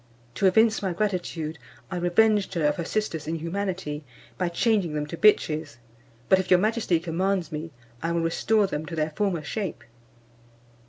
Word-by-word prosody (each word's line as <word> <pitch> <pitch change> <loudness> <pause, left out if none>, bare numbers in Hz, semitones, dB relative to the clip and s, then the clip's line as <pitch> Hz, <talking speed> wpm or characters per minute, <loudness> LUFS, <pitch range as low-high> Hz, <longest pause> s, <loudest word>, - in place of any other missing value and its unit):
To 190 - +2
evince 220 +4 +4
my 190 -3 -1
gratitude, 175 -5 -2 0.3
I 185 - -2
revenged 200 +4 +2
her 165 -3 +1
of 150 - +2
her 170 - -2
sisters' 165 -8 -2
inhumanity, 165 -1 -3 0.3
by 180 -2 -1
changing 195 -2 +1
them 150 0 -1
to 150 - -6
bitches; 160 - +2 0.5
but 190 - +5
if 190 - -3
your 180 - +6
majesty 215 -4 +1
commands 175 +2 -1
me, 155 +2 -5 0.3
I 165 - -1
will 170 0 +1
restore 205 +6 +2
them 155 -4 -4
to 170 - -5
their 155 0 -1
former 180 -2 -1
shape." 195 +4 -4
175 Hz, 165 wpm, -26 LUFS, 160-200 Hz, 0.5 s, your